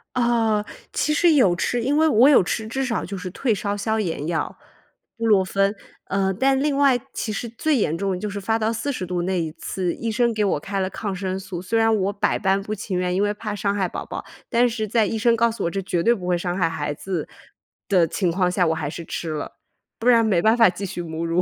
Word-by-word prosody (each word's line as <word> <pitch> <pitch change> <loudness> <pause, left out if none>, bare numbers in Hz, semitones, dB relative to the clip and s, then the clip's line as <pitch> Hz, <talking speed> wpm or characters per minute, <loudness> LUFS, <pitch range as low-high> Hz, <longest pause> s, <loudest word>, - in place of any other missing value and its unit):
啊， 230 -3 +2 0.3
其 300 - 0
实 330 +2 +4
有 220 -12 +4
吃， 240 +7 -1
因 285 +4 +1
为 320 0 +4
我 255 0 +6
有 280 - +6
吃 220 +4 -3
至 265 +4 -2
少 230 -3 -1
就 195 +1 -5
是 185 -1 -5
退 240 +2 0
烧 205 0 -2
消 220 +2 -1
炎 165 -6 -2
药， 165 -1 -2 0.6
布 230 - -2
洛 205 -4 +5
芬。 195 +2 +1 0.3
呃， 195 -1 0
但 265 +7 +2
另 290 -1 +1
外 275 -3 +4
其 215 - -3
实 235 +3 -4
最 300 +7 0
严 165 - +1
重 195 +1 -1
的 180 - -2
就 210 - -3
是 200 0 -5
发 225 +3 0
到 220 +1 +1
40 230 -2 -3
度 175 -1 -2
那 185 -1 0
一 160 -1 -3
次， 180 +2 -3
医 230 -1 -3
生 235 +1 +2
给 215 -2 0
我 185 - +1
开 195 +5 -4
了 185 - 0
抗 200 -3 -4
生 190 0 -3
素， 185 -2 -6
虽 225 +5 0
然 225 0 +4
我 200 0 0
百 200 - 0
般 195 0 +1
不 210 +2 -4
情 190 -3 -3
愿， 180 0 0
因 195 - +2
为 205 0 +1
怕 210 0 -5
伤 200 0 0
害 190 -3 0
宝 - - -6
宝， - - -6 0.3
但 240 0 +3
是 220 -2 -3
在 220 -1 +2
医 225 - -2
生 230 +1 +3
告 235 +1 +3
诉 225 - -5
我 170 - 0
这 195 - -2
绝 180 -3 -1
对 235 - +5
不 185 -6 -6
会 180 -1 +2
伤 175 0 -2
害 180 -3 +1
孩 145 -2 -3
子 175 +1 -4 0.6
的 180 -5 +4
情 180 +1 0
况 180 0 +1
下 180 -1 +2
我 160 - +1
还 150 -2 -3
是 170 +3 -6
吃 165 0 -4
了， 150 -1 -5 0.4
不 235 - -3
然 230 -2 +6
没 200 -6 +2
办 220 +6 +4
法 230 -5 +6
继 195 +2 -5
续 180 -1 -5
母 165 0 -4
乳。 170 +2 +1
200 Hz, 275 characters per minute, -23 LUFS, 180-230 Hz, 0.6 s, 我